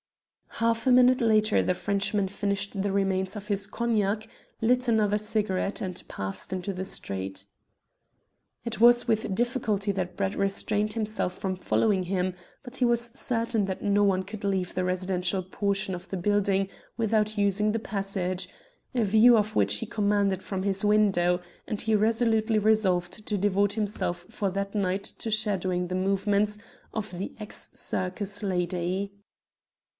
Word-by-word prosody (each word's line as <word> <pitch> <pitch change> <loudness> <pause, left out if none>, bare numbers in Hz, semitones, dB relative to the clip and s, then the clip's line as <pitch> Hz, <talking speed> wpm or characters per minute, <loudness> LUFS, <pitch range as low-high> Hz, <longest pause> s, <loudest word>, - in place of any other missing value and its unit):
Half 230 0 +1
a 260 - +4
minute 250 0 +6
later 215 -2 +4
the 180 - +1
Frenchman 200 +1 0
finished 200 0 -2
the 200 0 0
remains 190 0 0
of 210 -1 -7
his 200 -1 -1
cognac, 215 -1 0 0.3
lit 250 +2 +2
another 210 -3 +3
cigarette, 210 -2 -1
and 185 -2 -3
passed 95 0 -4
into 190 +1 -3
the 190 +1 -4
street. 95 - -4 1.2
It 235 -1 -2
was 240 +1 +6
with 220 -3 +1
difficulty 220 -3 0
that 185 -2 -3
Brett 195 0 -1
restrained 205 +2 0
himself 215 -5 -1
from 190 -2 -2
following 190 +1 +1
him, 185 0 -1 0.3
but 255 0 -8
he 250 - +3
was 235 0 +2
certain 230 -3 0
that 190 -1 -4
no 205 0 +3
one 190 -2 +2
could 205 +2 -9
leave 190 -2 -1
the 185 - -1
residential 185 0 0
portion 195 0 -1
of 175 - -10
the 190 - -3
building 195 +1 +1 0.3
without 215 -1 +1
using 205 +1 +2
the 225 - -1
passage 195 -3 -2 0.4
a 240 -3 +2
view 220 +4 +6
of 215 0 0
which 100 0 +3
he - - -3
commanded 200 -2 +1
from 190 -2 -3
his 195 0 -1
window 195 -4 +3 0.3
and 215 -3 -2
he 220 -1 +2
resolutely 220 0 +2
resolved 210 -2 +1
to 210 - 0
devote 200 +1 +2
himself 205 -5 -2
for 200 - -2
that 200 +1 -3
night 195 -1 0
to 225 - -5
shadowing 190 -4 0
the 180 - -3
movements 200 +2 +1 0.4
of 215 -4 -4
the 190 - -5
ex 210 - -4
circus 195 +3 -3
lady. 180 +1 -1
200 Hz, 155 wpm, -27 LUFS, 190-215 Hz, 1.2 s, minute